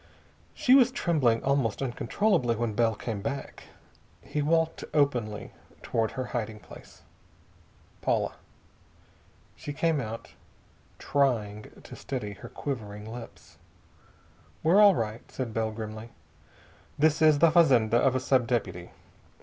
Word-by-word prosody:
She 255 - +3
was 255 -2 +6
trembling 145 - +1
almost 135 -6 +1
uncontrollably 125 - 0
when 115 -1 -2
Bell 115 0 +2
came 105 -2 -5
back. 140 +5 -5 0.6
He 150 +1 -3
walked 165 +2 +1
openly 120 -8 0 0.3
toward 110 -1 -1
her 130 -1 -3
hiding 110 -3 -3
place. - - -15 1.0
"Paula." - - 0 1.2
She 145 - -7
came 160 0 +1
out, 115 -1 -7 0.7
trying 110 -7 -1
to - - -11
steady 110 -7 -5
her 100 - -11
quivering 105 -7 -6
lips. 115 +1 -11 1.0
"We're 175 +6 +5
all 200 -3 +7
right," 110 -2 -3
said 125 -4 -4
Bell 110 0 0
grimly. 110 +1 -7 0.9
"This 155 +1 +2
is 155 -2 +6
the 165 +2 +5
fazenda 125 -10 +4
of 130 +1 +2
a - - +2
sub 130 -2 +1
deputy. 100 -7 -2
125 Hz, 125 wpm, -28 LUFS, 110-145 Hz, 1.2 s, all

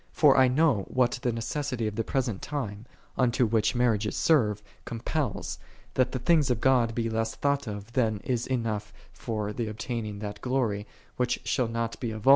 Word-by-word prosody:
For 145 -4 +5
I 130 - +6
know 125 -6 +3
what 125 -1 +1
the 120 - +1
necessity 115 +1 -2
of 105 - -1
the 115 - 0
present 120 -5 -1
time, 115 -7 -4 0.3
unto 125 -1 +3
which 110 +2 +1
marriages 110 -4 +1
serve, 105 -10 +3 0.2
compels, 125 +5 -3 0.3
that 130 -1 +2
the - - -2
things 150 +2 +3
of 125 -3 +1
God 120 -3 +3
be 115 -1 0
less 115 0 -1
thought 140 -2 0
of 105 +2 -6
than 110 -5 +1
is 125 -2 -1
enough 110 -5 -2 0.2
for 105 -3 -3
tiie 115 -2 -2
obtaining 110 -1 -4
that 105 0 -6
glory, 115 -6 0 0.3
which 125 -1 0
shall 115 +2 +1
not 115 0 -3
be 120 - -2
of 110 -1 -6
r>isf>f»s,tti\>. 135 - +4
115 Hz, 185 wpm, -28 LUFS, 110-130 Hz, 0.3 s, I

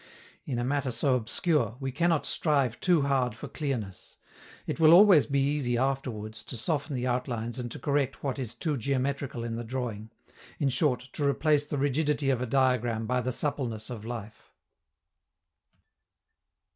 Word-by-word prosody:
In 130 - -3
a 120 - -1
matter 140 +1 0
so 125 +3 +2
obscure, 125 - 0
we 135 -1 -3
cannot 165 +3 +1
strive 140 -7 +1
too 175 -5 +3
hard 130 -5 +1
for - - -8
clearness. 120 - -5 0.5
It - - -4
will 160 0 +7
always 185 -4 +7
be 140 -1 +1
easy 135 -4 0
afterwards 120 -5 -2
to 125 - -5
soften 145 +3 -1
the 125 0 -2
outlines 120 -1 -2
and 120 -1 -5
to - - -5
correct 140 -2 -1
what 135 -1 -2
is 120 -4 -5
too 155 -5 -2
geometrical 135 0 -2
in 115 -1 -3
the 120 - -4
drawing 115 -3 -4 0.5
in 140 -4 +1
short, 130 -1 0
to 150 - -3
replace 145 0 +2
the 145 - -3
rigidity 145 0 +1
of 125 -2 0
a 125 - -2
diagram 120 -3 +1
by 125 +2 0
the 130 +1 -2
suppleness 125 -5 -3
of 110 -4 -6
life. 110 -2 -8
130 Hz, 165 wpm, -28 LUFS, 120-145 Hz, 0.5 s, will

